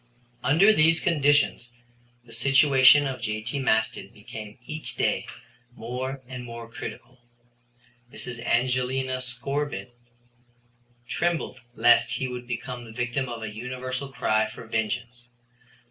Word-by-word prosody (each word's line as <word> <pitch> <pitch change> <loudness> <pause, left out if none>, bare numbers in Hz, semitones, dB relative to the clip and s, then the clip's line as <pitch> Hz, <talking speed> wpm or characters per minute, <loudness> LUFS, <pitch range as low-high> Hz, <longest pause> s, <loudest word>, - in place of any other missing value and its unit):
Under 190 +10 +6
these 165 -1 +5
conditions 145 -6 +2 0.5
the 115 - -12
situation 140 0 +6
of 130 -3 -4
J.T. 110 +4 -2
Maston 110 -4 0
became 105 -1 -10
each 155 +2 -4
day - - 0 0.5
more 130 +4 -5
and 125 -1 -7
more 115 -1 -8
critical. 125 +2 -9 0.9
Mrs. 125 -1 -5
Evangelina 125 +2 0
Scorbitt 130 +1 -3 1.1
trembled 170 -6 -1
lest 120 +1 +5
he 130 - -1
would 125 -1 -7
become 120 0 -5
the 115 - -11
victim 125 +3 -2
of 115 -2 -6
a 105 -1 -5
universal 125 +3 -4
cry 110 -4 +1
for 110 - -10
vengeance. 115 +2 -3
125 Hz, 115 wpm, -26 LUFS, 115-135 Hz, 1.1 s, Under